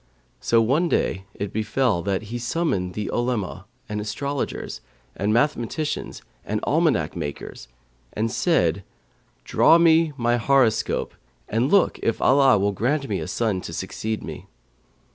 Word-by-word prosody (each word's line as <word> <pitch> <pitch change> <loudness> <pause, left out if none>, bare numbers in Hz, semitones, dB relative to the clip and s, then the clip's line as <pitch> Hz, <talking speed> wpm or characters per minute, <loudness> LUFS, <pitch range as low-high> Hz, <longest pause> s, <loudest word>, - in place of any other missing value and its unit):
So 115 -1 +3
one 150 +10 +2
day 95 -9 0
it 100 -1 -5
befell 110 -2 0
that 100 +2 -1
he 115 +3 -5
summoned 120 - -1
the 105 -1 -3
Olema 110 -6 -2 0.2
and 105 -1 -3
astrologers, 140 +7 -4 0.3
the 100 - -2
mathematicians 135 +5 -1 0.2
and - - -2
almanac - - +1
makers, 75 -5 -6 0.5
and 110 +1 -1
said, - - +1 0.6
'Draw 165 - +5
me 165 -1 +4
my 120 0 +1
horoscope 125 -2 +1 0.3
and 115 +5 0
look 200 +1 +3
if 115 - 0
Allah 135 -4 +5
will 100 +1 +1
grant 135 +8 -1
me - - -2
a - - -5
son 105 -6 -1
to 85 - -7
succeed 110 +5 -4
me.' - - -8
115 Hz, 140 wpm, -23 LUFS, 105-135 Hz, 0.6 s, Draw